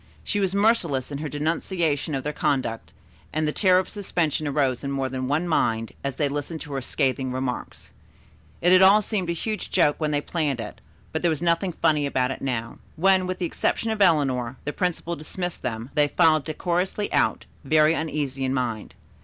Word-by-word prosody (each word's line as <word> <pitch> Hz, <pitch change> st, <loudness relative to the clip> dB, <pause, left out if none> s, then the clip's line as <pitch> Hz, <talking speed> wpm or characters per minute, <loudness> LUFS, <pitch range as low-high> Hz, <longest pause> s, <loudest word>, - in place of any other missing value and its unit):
She 205 Hz, -, -1 dB
was 195 Hz, -1 st, 0 dB
merciless 190 Hz, -, +2 dB
in 140 Hz, -, -4 dB
her 150 Hz, 0 st, -4 dB
denunciation 155 Hz, 0 st, -1 dB
of 135 Hz, -, -3 dB
their 150 Hz, -, -3 dB
conduct, 130 Hz, -7 st, -1 dB, 0.4 s
and 155 Hz, 0 st, 0 dB
the -, -, +1 dB
terror 185 Hz, +2 st, +4 dB
of 185 Hz, -, +1 dB
suspension 170 Hz, -7 st, -1 dB
arose 135 Hz, -3 st, 0 dB
in 140 Hz, -, -3 dB
more 135 Hz, -1 st, -1 dB
than 130 Hz, 0 st, -3 dB
one 155 Hz, +6 st, 0 dB
mind, 115 Hz, -8 st, +1 dB
as 140 Hz, -2 st, -2 dB
they 145 Hz, -, +1 dB
listened 145 Hz, +3 st, -4 dB
to 145 Hz, -, -7 dB
her 135 Hz, -, -2 dB
scathing 130 Hz, 0 st, -1 dB
remarks. 130 Hz, -1 st, -5 dB, 0.7 s
It 175 Hz, +1 st, +5 dB
had 185 Hz, -, +7 dB
all 200 Hz, +3 st, +7 dB
seemed 190 Hz, -4 st, -2 dB
a -, -, +1 dB
huge 215 Hz, +5 st, -4 dB
joke 160 Hz, -5 st, +3 dB
when 155 Hz, -1 st, 0 dB
they 145 Hz, -1 st, +1 dB
planned 145 Hz, -4 st, -2 dB
it, 105 Hz, -2 st, -7 dB, 0.3 s
but 160 Hz, -, -2 dB
there 175 Hz, -, +2 dB
was 155 Hz, -3 st, -1 dB
nothing 170 Hz, +2 st, +1 dB
funny 155 Hz, -3 st, +2 dB
about 130 Hz, -2 st, 0 dB
it -, -, -6 dB
now. 115 Hz, -4 st, -3 dB, 0.2 s
When, 185 Hz, +2 st, +3 dB
with 185 Hz, 0 st, -3 dB
the 180 Hz, -, -2 dB
exception 225 Hz, +6 st, -1 dB
of 215 Hz, -2 st, -2 dB
Eleanor, 135 Hz, -8 st, +2 dB
the 150 Hz, -, -2 dB
principal 170 Hz, -1 st, -2 dB
dismissed 175 Hz, +3 st, -4 dB
them, 115 Hz, +2 st, -4 dB
they 150 Hz, -1 st, +3 dB
filed 155 Hz, -1 st, +3 dB
decorously 180 Hz, +5 st, -1 dB
out, -, -, +1 dB, 0.2 s
very 155 Hz, +2 st, +4 dB
uneasy 145 Hz, -4 st, -2 dB
in 130 Hz, 0 st, 0 dB
mind. 120 Hz, -4 st, -3 dB
150 Hz, 200 wpm, -24 LUFS, 135-175 Hz, 0.7 s, had